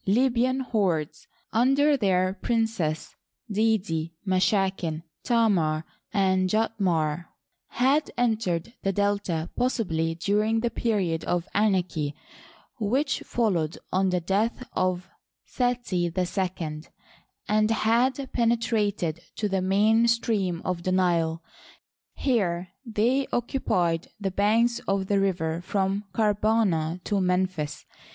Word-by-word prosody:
Libyan 250 +4 +2
hordes, 175 - -1 0.3
under 275 +5 +4
their 185 -6 +2
princes, 220 -7 -1 0.4
Didiy 195 -7 0
Mashaken, 185 -4 +1 0.2
Tamar, 180 -10 +2 0.3
and 190 -2 +2
Tjautmary 180 -7 0 0.4
had 275 +5 +2
entered 220 -5 0
the 195 - 0
Delta 200 -5 -1
possibly 165 -10 0
during 210 +6 +1
the 235 0 0
period 195 -9 0
of 175 0 -1
anarchy 180 -8 +1 0.6
which 255 +6 0
followed 180 -9 -1
on 190 +1 +2
the 180 0 +1
death 210 +8 -1
of 185 0 0 0.4
Seti 245 -8 -1
II, 180 -4 -2 0.7
and 215 0 +2
had 245 +5 +1
penetrated 220 -8 0
to 210 - -1
the 190 -2 0
main 210 +5 +3
stream 210 -7 0
of 180 -2 -2
the 185 - -1
Nile. 170 -3 +1 0.7
Here 185 -9 0
they 240 +4 +1
occupied 180 -9 0
the 195 -2 -2
banks 225 +5 +2
of 195 -1 +1
the 200 +1 +1
river 170 -4 0
from 195 +2 -1
Karbana 200 -5 +1
to 205 -2 0
Memphis. 180 -5 -1
195 Hz, 105 wpm, -26 LUFS, 175-225 Hz, 0.7 s, under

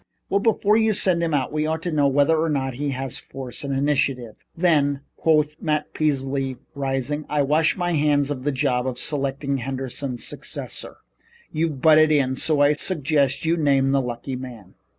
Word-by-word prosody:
"Well, 200 - +3
before 210 -1 +2
we 220 0 +4
send 185 -3 +1
him 165 -1 0
out 135 -2 -1
we 155 0 0
ought 160 +1 -2
to 175 - -2
know 145 -2 +3
whether 145 +3 +3
or 160 +1 +1
no 135 -3 -1
he 140 +4 -3
has 135 -1 -4
force 130 -1 -8
and 140 - -3
initiative." 135 -4 0 0.2
"Then," 145 -5 +2
quoth 155 -1 +2
Matt 150 -1 -1
Peasley, 135 -3 -1 0.2
rising, 140 +1 -2
"I 150 -1 +1
wash 155 +5 +2
my 175 -1 -1
hands 145 -2 +2
of 130 -3 -4
the 145 - +1
job 130 -2 0
of 125 -1 -3
selecting 140 0 -2
Henderson's 130 0 -4
successor. - - -6 0.5
You've 155 -4 -2
butted 155 0 +6
in, 135 -3 +2
so 150 +1 +1
I 145 +1 +5
suggest 145 -2 0
you 165 +2 +2
name 135 -3 +2
the 135 0 +3
lucky 125 +1 -5
man." 120 -7 -9
145 Hz, 180 wpm, -23 LUFS, 135-155 Hz, 0.5 s, butted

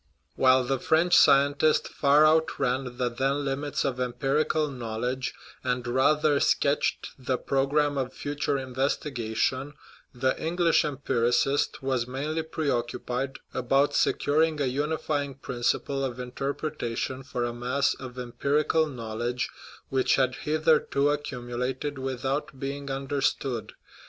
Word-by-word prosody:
While 130 0 +5
the 135 +1 -1
French 165 +6 +3
scientist 145 +3 +5
far 145 +2 +4
outran 135 -5 +1
the 125 - +1
then 135 +4 -1
limits 140 +1 -2
of 125 -2 -1
empirical 135 +5 0
knowledge, 125 0 -3 0.3
and 125 -1 -1
rather 145 +4 +3
sketched 140 +1 +1
the 130 0 -1
pro 135 +1 0
gramme 145 0 +1
of 130 -1 -2
future 145 0 -2
investigation, 130 0 -1 0.4
the 130 +1 0
English 170 +1 +3
empiri 135 -5 0
cist 135 +2 +1
was 130 -3 0
mainly 145 +5 -2
preoccupied 135 -3 -2 0.2
about 135 +3 +2
securing 155 +1 +2
a 140 - +1
unifying 145 +1 -1
principle 135 +2 -1
of 125 -2 -3
interpretation 130 0 -3
for 130 -2 -4
a 120 0 -2
mass 125 +4 0
of 130 -2 -9
empirical 145 +6 +1
knowledge 120 -1 -3 0.4
which 130 -1 +2
had 130 -2 +2
hitherto 150 -1 +2
accumulated 130 0 -3
without 135 +2 -3
being 140 +1 -4
understood. 135 -3 -2
135 Hz, 120 wpm, -27 LUFS, 125-145 Hz, 0.4 s, While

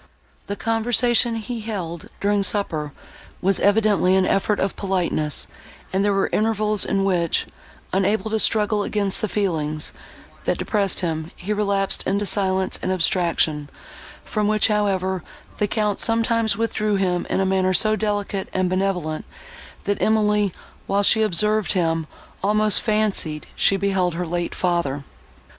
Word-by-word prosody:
The 200 - -3
conversation 235 +2 +2
he 225 +2 -4
held, 180 -7 -5
during 205 0 +2
supper, 175 -7 -1 0.5
was 195 +1 +1
evidently 205 -3 +3
an 190 -1 +3
effort 200 +2 +1
of 195 - -1
politeness, 175 -6 -1 0.5
and 190 +1 +2
there 205 - +2
were 195 0 +1
intervals 215 -1 +1
in 195 - 0
which, 175 -4 +1 0.5
unable 200 +2 +1
to 220 - +1
struggle 210 -1 +2
against 200 -2 -1
the 215 - 0
feelings, 155 -7 -2 0.5
that - - +1
depressed 200 -4 0
him, 160 -2 -2
he 205 +4 -3
relapsed 200 -2 +1
into 200 +2 0
silence 190 -2 +1
and 185 - -1
abstraction, 165 -4 +1 0.6
from 210 -1 -1
which, 215 +1 +2
however, 190 -3 0 0.4
the 210 - +2
Count, 210 -1 0
sometimes, 230 -2 +2
withdrew 215 -2 0
him 180 -2 0
in - - 0
a 195 - +2
manner 190 0 +2
so 215 +3 +4
delicate 205 -2 -2
and 185 -1 0
benevolent, 185 -5 -1 0.6
that 205 -1 -1
Emily, 210 -2 +2 0.4
while 200 +1 +1
she 220 +2 +4
observed 215 +1 +2
him, 165 -4 0 0.4
almost 215 0 +3
fancied 210 -8 0
she 195 - +3
beheld 190 -3 0
her 180 +1 -2
late 175 +1 -3
father. 170 -6 -1
195 Hz, 145 wpm, -22 LUFS, 180-210 Hz, 0.6 s, so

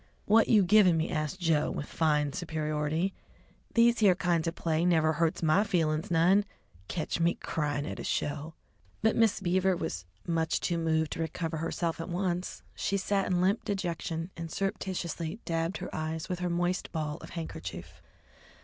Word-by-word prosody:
"What 220 +2 +5
you 210 -3 +6
givin' 185 -2 +5
me?" 160 +1 -1
asked 155 +4 -2
Joe, 165 -4 +2
with 145 - -4
fine 150 -3 +1
superiority. 155 +2 -1 0.6
"These 235 0 +5
here 200 -4 +5
kinds 170 -2 +1
of 165 - -2
play 160 0 0
never 160 -3 +3
hurts 165 +1 0
my 160 +6 +4
feelin's 160 -6 0
none. 175 +4 +4 0.4
Catch 165 -1 -2
me 170 +1 +2
cryin' 145 -2 -2
at - - -5
a - - -5
show!" 150 +2 -2 0.5
But 220 - +3
Miss 225 -3 +3
Beaver 190 0 +2
was 90 - -4 0.2
too 175 - -3
much 165 +2 0
moved 160 -2 +1
to - - -4
recover 160 0 -2
herself 165 +1 -2
at 165 - -6
once. 180 0 -2
She 200 - -1
sat 195 0 0
in 180 -1 +1
limp 195 +4 +2
dejection 170 -3 -3
and 165 -1 -6
surreptitiously 180 -3 -3
dabbed 165 +2 -1
her - - -7
eyes 155 +1 -3
with 180 -2 -3
her 180 0 -1
moist 175 +2 -1
ball 155 -2 -3
of - - -11
a - - -12
handkerchief. 85 - -7
165 Hz, 175 wpm, -30 LUFS, 160-185 Hz, 0.6 s, you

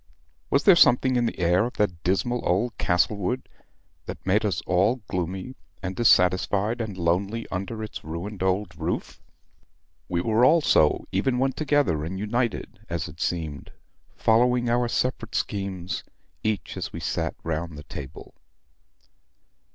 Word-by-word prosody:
Was - - +2
there 195 -4 +8
something 130 -4 +5
in 120 -1 +2
the - - -4
air 90 +2 +3
of 125 - -8
that 90 -5 -1
dismal 100 +7 0
old 110 +7 +1
Castlewood 100 +7 0 0.6
that - - -7
made 100 +4 +2
us 105 -3 0
all 100 +7 +2
gloomy, 95 +7 -3 0.3
and 95 +1 -3
dissatisfied, 100 +1 +3
and 105 -4 -5
lonely 95 +6 0
under 100 +4 -4
its 110 - -7
ruined 90 +6 -6
old 95 0 0
roof? - - -4 0.9
We 85 - 0
were 110 +4 +2
all 165 +6 +6
so, 75 - +3
even 125 +7 +1
when 135 +1 +2
together 135 - +1
and 90 +4 -4
united, 115 +2 -2
as - - -2
it - - -11
seemed, 80 -5 -3 0.4
following 120 +1 +3
our 120 0 +2
separate 120 -1 -2
schemes, 95 -3 -3 0.4
each 105 -6 -2
as - - -4
we - - -6
sat - - -2
round 80 0 -3
the 75 - -9
table." 70 -4 -9
100 Hz, 145 wpm, -25 LUFS, 90-120 Hz, 0.9 s, there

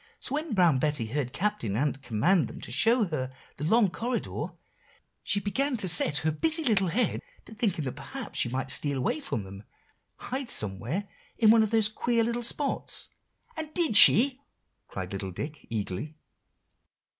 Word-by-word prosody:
So, - - -4
when 300 -4 -2
Brown 170 -8 +4
Betty 145 -4 0
heard 125 +2 -3
Captain 195 - -2
Ant 145 +1 -1
command 135 - +1
them - - -10
to - - -8
show 225 - +3
her 130 -5 -3 0.3
the 140 - -6
long 205 +3 +3
corridor, 240 +4 -3 0.7
she 205 - 0
began 250 +7 -1
to 200 - -1
set 165 -3 +5
her 155 - +3
busy 320 - +1
little 205 -8 +2
head 220 +8 0 0.2
to - - -12
thinking 200 -9 -1
that 130 - -2
perhaps 205 - -7
she 120 - +1
might 130 +1 -2
steal 140 0 -1
away 130 - -1
from 275 - -4
them, 95 0 -10
and - - -21 0.5
hide 260 -1 -5
somewhere 115 - -1 0.3
in 220 -2 +5
one 225 0 +5
of 220 - +1
these 220 -1 +3
queer 230 +2 0
little 235 +1 -2
spots." 275 +4 -3 0.5
"And 315 -1 -5
did 330 -11 +1
she?" 260 +6 +8 0.5
cried 95 -2 -6
little 95 -1 -4
Dick 145 - -7
eagerly. 110 +7 -4
185 Hz, 175 wpm, -27 LUFS, -, 0.7 s, she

